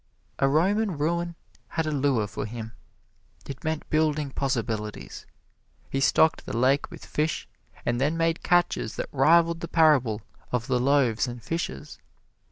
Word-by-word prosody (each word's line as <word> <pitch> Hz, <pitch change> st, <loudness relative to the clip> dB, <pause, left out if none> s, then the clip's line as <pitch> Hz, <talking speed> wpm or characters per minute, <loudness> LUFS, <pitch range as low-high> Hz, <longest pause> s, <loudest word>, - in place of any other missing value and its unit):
A 135 Hz, -, +4 dB
Roman 190 Hz, +5 st, +2 dB
ruin 170 Hz, +3 st, -1 dB, 0.3 s
had 160 Hz, -1 st, -2 dB
a 155 Hz, -, -1 dB
lure 135 Hz, -6 st, +1 dB
for 105 Hz, +1 st, -5 dB
him. 110 Hz, 0 st, -7 dB, 0.8 s
It 135 Hz, -, -8 dB
meant 160 Hz, -1 st, -2 dB
building 155 Hz, -2 st, +1 dB
possibilities. 115 Hz, -6 st, -3 dB, 0.6 s
He 135 Hz, -, 0 dB
stocked 160 Hz, +3 st, +3 dB
the -, -, -3 dB
lake 135 Hz, +4 st, +2 dB
with -, -, -11 dB
fish, 155 Hz, +1 st, -2 dB, 0.4 s
and 120 Hz, +1 st, 0 dB
then 150 Hz, +4 st, +1 dB
made 165 Hz, 0 st, +1 dB
catches 175 Hz, -10 st, +1 dB
that -, -, -4 dB
rivaled 165 Hz, +4 st, +4 dB
the 170 Hz, -, -5 dB
parable 135 Hz, -11 st, +3 dB, 0.3 s
of 125 Hz, -2 st, -1 dB
the 130 Hz, -2 st, +1 dB
loaves 130 Hz, -3 st, +2 dB
and 120 Hz, -1 st, -7 dB
fishes. 165 Hz, -, -4 dB
145 Hz, 150 wpm, -26 LUFS, 120-160 Hz, 0.8 s, A